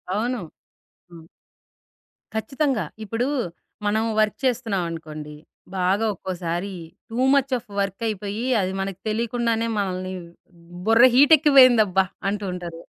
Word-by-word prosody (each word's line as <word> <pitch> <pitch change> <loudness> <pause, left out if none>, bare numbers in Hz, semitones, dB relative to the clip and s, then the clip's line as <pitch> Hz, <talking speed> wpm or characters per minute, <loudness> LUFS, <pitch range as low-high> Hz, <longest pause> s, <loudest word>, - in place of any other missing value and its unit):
అవును. 240 +3 -1 0.7
హ్మ్. 165 -2 -13 1.1
ఖచ్చితంగా. 265 - -1 0.2
ఇప్పుడు 225 +4 -2 0.6
మనం 215 +2 +1 0.2
వర్క్ 215 -1 +2
చేస్తున్నావనుకోండి. 165 - -3 0.4
బాగా 190 +4 +1
ఒక్కోసారి 180 +1 -4 0.4
టూ 225 - -6 0.2
ముచ్ 275 -1 +2
ఆఫ్ 235 - -12
వర్క్ 195 +3 -2
అయిపోయి 210 +1 -4 0.2
అది 185 0 -1
మనకు 195 -1 -4
తెలియకుండానే 230 +1 0
మనల్ని 185 -2 -2 0.7
బుర్ర 225 +2 +6
హీట్ 285 +4 +7
ఎక్కిపోయిందబ్బా! 245 - +5 0.2
అంటూ 205 +1 -2
ఉంటారు. 170 -2 -7
210 Hz, 105 wpm, -23 LUFS, 185-235 Hz, 1.1 s, హీట్